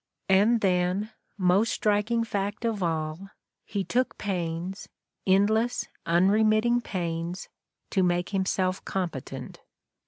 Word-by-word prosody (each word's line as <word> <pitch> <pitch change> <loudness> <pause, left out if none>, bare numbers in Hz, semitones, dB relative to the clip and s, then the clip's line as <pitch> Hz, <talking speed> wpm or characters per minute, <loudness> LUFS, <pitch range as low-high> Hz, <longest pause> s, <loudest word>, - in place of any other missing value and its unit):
And 210 +4 +4
then, 185 +3 +1 0.3
most 190 +4 +3
striking 215 +2 +1
fact 205 0 -3
of 220 -3 -1
all, 160 +2 -2 0.4
he 200 -2 -2
took 250 +6 0
pains, 180 -1 -3 0.4
endless, 215 +5 +2 0.2
unremitting 215 +7 +3
pains, 170 -3 -4 0.4
to 190 - +2
make 175 -1 +1
himself 190 -1 0
competent. 170 -9 -4
195 Hz, 100 wpm, -27 LUFS, 180-215 Hz, 0.4 s, And